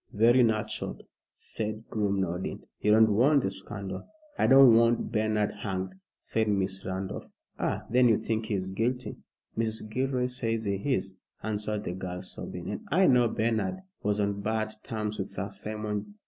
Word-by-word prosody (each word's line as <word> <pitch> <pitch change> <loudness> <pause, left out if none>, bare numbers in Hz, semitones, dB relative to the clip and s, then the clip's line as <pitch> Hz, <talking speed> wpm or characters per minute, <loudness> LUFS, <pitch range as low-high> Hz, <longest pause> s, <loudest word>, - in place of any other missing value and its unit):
"Very 120 +4 +5
natural," 110 -3 0 0.3
said 110 +1 -3
Groom, 100 -3 +1
nodding. 90 0 -3 0.2
"You 105 - +1
don't 110 0 +6
want 135 +6 +4
the 95 - 0
scandal." 95 0 -5 0.3
"I - - +2
don't 135 -3 +8
want 115 +1 +3
Bernard 110 -1 +1
hanged," 95 -2 -3 0.2
said 110 -1 -1
Miss 95 -2 0
Randolph. 95 +1 -4 0.3
"Ah! - - -1
Then 125 +1 +4
you 110 - +5
think 110 0 -2
he 105 - 0
is 95 0 -3
guilty." 120 +6 -1 0.4
"Mrs. 110 -1 -1
Gilroy 130 +1 0
says 115 -3 -2
he 100 -2 0 0.2
is," 95 0 -4 0.3
answered 105 -1 -2
the 90 - -3
girl, 90 0 -5
sobbing, 90 - -5
"and - - -4
I 185 +5 +4
know 125 -5 +5
Bernard 115 - -1 0.2
was 105 0 0
on 100 0 0
bad 110 0 -1
terms 105 -1 -3
with 95 - -2
Sir 100 +3 -4
Simon. 105 - -4
110 Hz, 165 wpm, -29 LUFS, 100-115 Hz, 0.4 s, don't